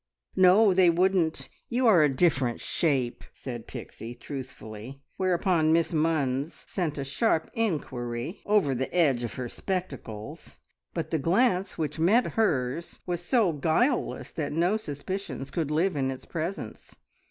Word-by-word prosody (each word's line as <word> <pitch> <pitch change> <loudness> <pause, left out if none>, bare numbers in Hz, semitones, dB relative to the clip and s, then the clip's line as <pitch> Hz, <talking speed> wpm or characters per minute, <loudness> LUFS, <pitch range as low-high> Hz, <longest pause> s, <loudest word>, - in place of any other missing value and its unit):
"No, 190 +3 +6
they 180 -1 +5
wouldn't. 175 -1 +2 0.2
You 250 +2 +1
are 200 -8 +7
a 150 - +5
different 130 -4 +1
shape," 135 -7 0
said 120 -4 -7
Pixie 115 +2 -8
truthfully, 130 -2 -8 0.2
whereupon 180 -3 +2
Miss 165 +1 +2
Munns 150 -2 0
sent 165 -6 -2
a 140 - -2
sharp 160 - 0
inquiry 135 - -2
over 205 -10 +3
the 130 +1 -2
edge 140 -9 +3
of 115 -5 -4
her 125 -1 -4
spectacles, 135 - -5 0.4
but - - -3
the 160 - +1
glance 185 - +2
which 155 -1 -3
met 205 +10 +3
hers 160 - 0
was 175 -1 -2
so 210 -3 +2
guileless 170 - 0
that 145 -2 -3
no 175 +6 +2
suspicions 185 -5 -5
could 160 -5 -1
live 165 +4 +1
in 135 -2 0
its 130 -1 -6
presence. 170 +4 -5
160 Hz, 140 wpm, -27 LUFS, 135-185 Hz, 0.4 s, are